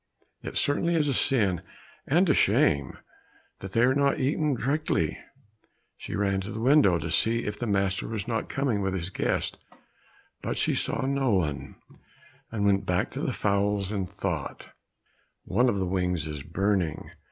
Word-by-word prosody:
It - - -5
certainly 170 +4 +1
is 155 -3 +2
a 140 - +1
sin 105 - +1 0.5
and 175 +7 +3
a 155 - +5
shame 70 -1 +2 0.6
that 95 -1 -8
they 115 - +3
are 125 +2 +5
not 140 0 +2
eaten 145 +2 +1
directly!" 125 - 0 0.8
She - - -6
ran 100 -1 +1
to 100 +3 -6
the 110 - -5
window, 125 - +5
to 85 -1 -4
see 115 +7 +2
if 105 0 -4
the 120 - -2
master 100 -2 0
was 110 -2 -4
not 115 -2 -2
coming 130 -7 0
with 95 -1 -1
his 90 0 -4
guest, - - -1 0.8
but - - -3
she - - +1
saw - - -1
no 135 -1 +1
one, 75 -6 -2 0.8
and 105 -3 -1
went 100 -1 +3
back 90 0 0
to - - -5
the - - 0
fowls 100 -1 0
and 95 -4 -2
thought, 95 -7 -4 0.7
"One 125 +1 +2
of 100 - 0
the 95 - 0
wings 90 -3 -1
is 75 -2 -5
burning! 90 0 -1
100 Hz, 170 wpm, -27 LUFS, 95-130 Hz, 0.8 s, a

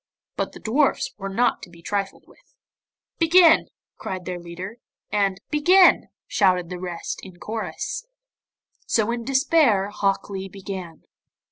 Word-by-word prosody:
But - - -3
the - - -10
dwarfs 270 +6 +1
were 195 0 -4
not 240 +6 +1
to 185 - -10
be 170 -1 -17
trifled 200 0 -3
with. - - -24 0.6
'Begin!' 330 0 +6 0.3
cried 185 -2 -5
their 180 -1 -4
leader, 175 +6 -8 0.3
and 195 -2 +1
'Begin!' 360 +5 +5 0.2
shouted 180 -3 +2
the 180 - -5
rest 175 -2 -5
in 185 -2 -13
chorus. 230 - -5 0.8
So 225 0 +1
in 235 -1 -4
despair 265 - +3
Hok 195 -2 0
Lee 195 -1 -6
began. 190 -4 -8
200 Hz, 135 wpm, -23 LUFS, 185-260 Hz, 0.8 s, Begin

